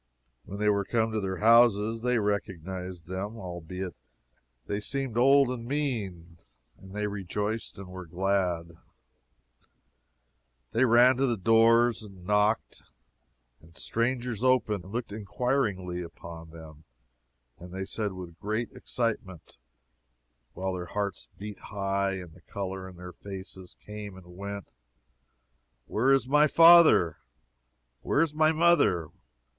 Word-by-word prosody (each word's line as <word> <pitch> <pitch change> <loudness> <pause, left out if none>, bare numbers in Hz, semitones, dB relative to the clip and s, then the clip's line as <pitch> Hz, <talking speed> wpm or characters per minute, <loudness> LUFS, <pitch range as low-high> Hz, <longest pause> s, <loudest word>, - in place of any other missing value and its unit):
When 100 - -7
they 105 +1 0
were 100 -1 +3
come 110 +2 0
to 110 -1 -1
their 95 -1 -3
houses, 115 -1 +4
they 125 0 +1
recognized 95 -4 -3
them, 95 +5 -5
albeit 90 -1 -6 0.7
they 100 - -2
seemed 135 +1 -3
old 135 +2 +5
and 120 -2 -5
mean; 100 - -3 0.4
and 95 +1 -13
they 105 0 -1
rejoiced, 105 +2 -3
and 100 -1 -9
were 90 -1 -9
glad. 90 -2 -1 1.9
They 120 +4 +3
ran 120 +2 +6
to 135 +1 +2
the 120 -2 0
doors, 115 +3 +4
and 95 -4 -13
knocked, 105 +2 +1 0.8
and 80 +1 -19
strangers 120 -1 -2
opened, 110 -7 +2
and 95 - -11
looked 115 -1 -4
inquiringly 105 -4 -1
upon 85 -1 -10
them. 80 -1 -13 0.8
And 90 +1 -11
they 95 +1 -4
said, 105 0 -3
with 90 -3 -9
great 110 +3 -2
excitement, 105 - -4 1.0
while 95 0 -3
their 90 -1 -4
hearts 100 -1 -3
beat 105 0 -8
high, 100 -1 -1
and 90 -4 -7
the 90 - -18
color 95 0 -5
in 90 - -13
their 90 0 -10
faces 95 -2 -10
came 105 -2 -8
and 90 -1 -14
went, 100 +1 -6 1.2
Where 130 +5 +1
is 135 -2 +3
my 150 +3 +5
father? 165 - +7 0.8
Where - - +1
is 165 -2 +1
my 155 +1 +4
mother? 155 - +3
100 Hz, 130 wpm, -28 LUFS, 90-115 Hz, 1.9 s, father